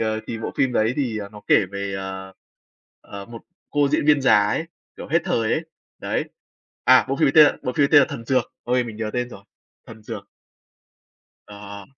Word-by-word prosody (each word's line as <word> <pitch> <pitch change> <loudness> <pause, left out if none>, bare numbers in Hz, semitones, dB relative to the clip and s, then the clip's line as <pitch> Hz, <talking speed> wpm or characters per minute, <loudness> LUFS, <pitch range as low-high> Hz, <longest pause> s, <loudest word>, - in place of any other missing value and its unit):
ờ, 110 0 -1
thì 115 - -5
bộ 110 - -5
phim 130 -2 +1
đấy 110 +1 +2
thì 125 -7 -1
nó 105 - -11
kể 100 - +4
về, 100 0 -4
ờ, 95 0 -6 0.7
ờ, 100 -1 -9
một 115 -1 -11 0.3
cô 145 -1 +2
diễn 150 +1 0
viên 150 -1 +5
già 130 - +6
ấy, 130 +10 -1 0.3
kiểu, - - -9
hết 165 +4 +3
thời 115 -1 0
ấy, 160 - -1 0.3
đấy. - - -2 0.6
À, 130 +1 +6
bộ 135 - -1
phim - - +3
ấy 135 - +2
tên 155 - +9
là - - 0
bộ 125 - -2
phim 145 0 +2
ấy - - +2
tên 145 - +9
là - - +3
"Thần 140 -6 -7
dược." 130 +1 0
Ôi, 125 0 +1
mình 115 -3 -8
nhớ 110 -1 -3
tên 125 0 -1
rồi! 100 -5 -13 0.4
"Thần 110 -1 -12
dược." 105 -2 -8 1.2
Ờ. 100 -1 -10
115 Hz, 215 wpm, -22 LUFS, 105-135 Hz, 1.2 s, tên